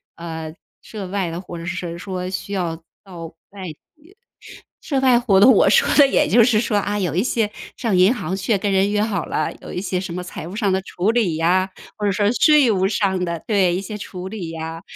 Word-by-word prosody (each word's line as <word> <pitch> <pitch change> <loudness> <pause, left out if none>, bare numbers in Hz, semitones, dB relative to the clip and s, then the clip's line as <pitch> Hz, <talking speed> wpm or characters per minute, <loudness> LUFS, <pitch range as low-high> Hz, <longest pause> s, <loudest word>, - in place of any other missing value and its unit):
呃， 160 -1 -7 0.3
涉 205 -4 -8
外 190 -2 -2
的 170 +2 -5
或 175 -2 -9
者 165 - -7
是 175 +1 -3
谁 175 -2 -5
说 185 0 -5
需 190 +2 -5
要 175 -4 -2 0.3
到 175 -4 -9 0.2
外 195 -2 -9
地。 - - -30 1.1
涉 275 -3 0
外 255 -2 +5
活 210 -6 +3
动， 225 +6 +8
我 - - +5
说 - - +4
的 285 - +8
也 270 - +2
就 230 +3 +5
是 225 -3 +3
说， 220 -2 -1
啊， 205 +1 -1
有 180 -5 -1
一 185 +5 +1
些 225 -4 0 0.2
上 225 -6 -1
银 185 +6 +5
行 190 -5 -4
去， 200 +2 0
跟 200 +1 -1
人 195 +1 +2
约 210 0 +1
好 205 -6 -1
了， 155 - -2
有 - - -8
一 - - -3
些 185 -1 -2
什 185 -1 -5
么 180 - -4
财 175 -3 -8
务 180 - -8
上 210 -2 0
的 190 0 0
处 190 +2 -1
理 220 -9 +1
呀， 185 +4 +2 0.3
或 210 - -5
者 200 - +2
说 205 +2 +1
税 295 -1 +5
务 190 -3 +2
上 190 -2 0
的 170 -2 -4
对， 195 -5 +2
一 180 - -1
些 205 +2 -6
处 185 -2 -7
理 190 -6 -6
呀。 165 0 -6
190 Hz, 255 characters per minute, -21 LUFS, 175-210 Hz, 1.1 s, 动